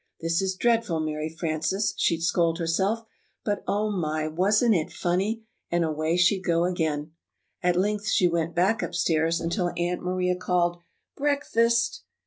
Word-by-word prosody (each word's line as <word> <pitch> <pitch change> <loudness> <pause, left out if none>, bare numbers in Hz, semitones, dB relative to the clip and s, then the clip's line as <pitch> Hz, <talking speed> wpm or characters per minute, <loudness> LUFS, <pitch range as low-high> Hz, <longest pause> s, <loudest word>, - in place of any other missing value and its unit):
"This 165 +2 0
is 190 -1 -1
dreadful, 225 -6 +1
Mary 155 0 -2
Frances," 165 +5 -1
she'd 165 -1 +1
scold 170 -1 +2
herself; 190 +7 0 0.4
"but, 205 -2 -1
oh, 210 +1 0
my, 155 -5 -1
wasn't 205 +8 +3
it 165 -5 0
funny!" 195 +6 -1 0.3
and 170 0 +1
away 155 +2 0
she'd 185 +2 +3
go 170 -2 +2
again. 160 -4 -1 0.5
At 180 -1 +2
length 205 +3 0
she 185 -4 +4
Went 170 -1 -1
back 200 +7 +2
upstairs 165 +1 +1
until 175 +2 -1
Aunt 175 +1 -1
Maria 180 0 0
called, 175 -1 0 0.4
"Breakfast!" 235 -5 +1
180 Hz, 145 wpm, -26 LUFS, 165-205 Hz, 0.5 s, she